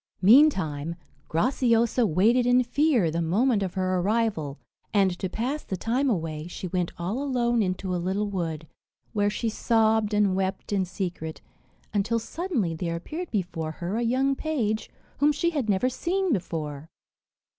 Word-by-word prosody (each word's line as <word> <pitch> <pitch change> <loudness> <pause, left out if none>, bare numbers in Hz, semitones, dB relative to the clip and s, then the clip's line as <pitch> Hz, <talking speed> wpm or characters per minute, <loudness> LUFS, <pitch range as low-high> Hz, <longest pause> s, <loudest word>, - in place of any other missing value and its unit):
Meantime, 185 - +4 0.3
Graciosa 235 - +2
waited 225 +9 +3
in 250 0 +5
fear 245 - +2
the 170 +2 -1
moment 205 +7 +2
of 190 -1 -3
her 185 -1 0
arrival, 195 -8 0 0.3
and, 195 -2 +3
to 190 - -2
pass 255 +10 -2
the 190 - -4
time 255 +8 0
away, 160 -6 -2
she 180 +1 -6
went 180 -1 -1
all 190 +10 -2
alone 240 -4 +1
into 185 -1 -2
a 175 - -1
little 195 +4 -1
wood, 165 -5 -3 0.5
where 205 -2 +2
she 230 +3 -2
sobbed 220 -1 +2
and 205 -3 +3
wept 190 +2 -2
in 190 -2 +1
secret, 175 -4 -5 0.5
until 210 +3 +1
suddenly 235 - -2
there 165 +1 -3
appeared 315 - -5
before 170 -6 -3
her 175 +5 -4
a 235 - 0
young 260 +4 +2
page, 230 -9 -1 0.3
whom 290 +2 +5
she 340 +4 0
had 280 -9 -2
never 200 +5 +2
seen 360 +6 0
before. 155 - -4
205 Hz, 155 wpm, -26 LUFS, 175-245 Hz, 0.5 s, in